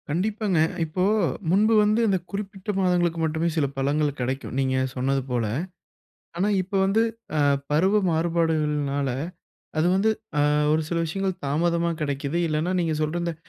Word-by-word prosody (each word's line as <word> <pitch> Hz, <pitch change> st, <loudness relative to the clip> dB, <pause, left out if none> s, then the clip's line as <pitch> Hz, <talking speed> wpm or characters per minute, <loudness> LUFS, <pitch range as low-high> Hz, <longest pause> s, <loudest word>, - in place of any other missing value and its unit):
கண்டிப்பாங்க. 200 Hz, +2 st, 0 dB, 0.2 s
இப்போ 165 Hz, +3 st, -2 dB, 0.5 s
முன்பு 215 Hz, +4 st, +4 dB
வந்து 215 Hz, +2 st, +2 dB
இந்த 195 Hz, -2 st, +2 dB
குறிப்பிட்ட 200 Hz, 0 st, -6 dB
மாதங்களுக்கு 175 Hz, -2 st, +1 dB
மட்டுமே 160 Hz, +1 st, 0 dB
சில 150 Hz, -, +3 dB
பழங்கள் 145 Hz, +1 st, 0 dB
கெடைக்கும், 130 Hz, +2 st, -3 dB
நீங்க 130 Hz, -1 st, +1 dB, 0.2 s
சொன்னது 135 Hz, +1 st, 0 dB
போல. 120 Hz, -2 st, 0 dB, 0.9 s
ஆனா, 190 Hz, +4 st, +1 dB
இப்ப 190 Hz, +2 st, -10 dB
வந்து 210 Hz, +4 st, +3 dB, 0.3 s
அ -, -, +2 dB, 0.3 s
பருவ 190 Hz, +8 st, +3 dB
மாறுபாடுகள்னால, 155 Hz, -4 st, 0 dB, 0.7 s
அது 155 Hz, -, +3 dB
வந்து 210 Hz, +3 st, +3 dB, 0.3 s
ஆ -, -, +4 dB, 0.3 s
ஒரு 160 Hz, +1 st, +2 dB
சில 170 Hz, -, -1 dB
விஷயங்கள் 190 Hz, +2 st, -3 dB
தாமதமா 170 Hz, +4 st, +1 dB
கெடைக்குது. 145 Hz, +2 st, -2 dB
இல்லைனா, 155 Hz, +4 st, 0 dB
நீங்க 165 Hz, -2 st, 0 dB
சொல்ற 155 Hz, +3 st, -1 dB
இந்த 170 Hz, -1 st, -2 dB
165 Hz, 140 wpm, -25 LUFS, 150-190 Hz, 0.9 s, முன்பு